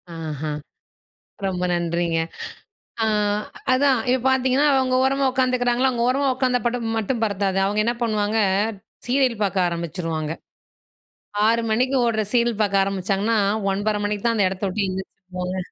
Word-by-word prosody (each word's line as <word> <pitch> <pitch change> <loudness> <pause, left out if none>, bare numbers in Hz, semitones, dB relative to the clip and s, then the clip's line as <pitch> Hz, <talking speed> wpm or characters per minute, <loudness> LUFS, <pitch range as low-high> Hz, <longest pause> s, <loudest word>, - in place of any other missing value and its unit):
ஆஹா. 155 -2 -4 1.0
ரொம்ப 180 -1 -2
நன்றிங்க. 170 -1 0 0.9
அ - - +2 0.7
அதான் 270 0 +3
இப்ப 255 -1 +2
பாத்தீங்கன்னா 265 +2 +3
அவுங்க 260 -1 +2
ஓரமா 275 +1 +1
உக்காந்துக்கிறாங்களா, 255 -1 +2
அவுங்க 235 -2 -1
ஓரமா 275 +2 +1
உக்காந்தா 255 -1 +1
படம் 235 -2 -1
மட்டும் 225 +2 -1
பத்தாது. 200 -2 0
அவங்க 205 +2 0
என்ன 240 - +1
பண்ணுவாங்க, 215 -1 0 0.7
சீரியல் 255 -3 +1
பாக்க 195 -1 -1
ஆரம்பிச்சுருவாங்க. 165 -2 -3 1.1
6:00 230 +1 +3
மணிக்கு 255 +4 +1
ஓடுற 220 -2 +1
சீரியல் 235 -2 +2
பாக்க 200 -2 +1
ஆரம்பிச்சாங்கன்னா, 195 +3 0 0.3
9:30 210 +2 0
மணிக்கு 205 0 -2
தான் 230 -1 +2
அந்த 200 - +3
இடத்தை 190 +1 -4
விட்டு 200 +1 -1
எந்திரிச்சு 190 +1 -6 0.2
போவாங்க. 180 +1 -3
215 Hz, 135 wpm, -22 LUFS, 190-250 Hz, 1.1 s, அதான்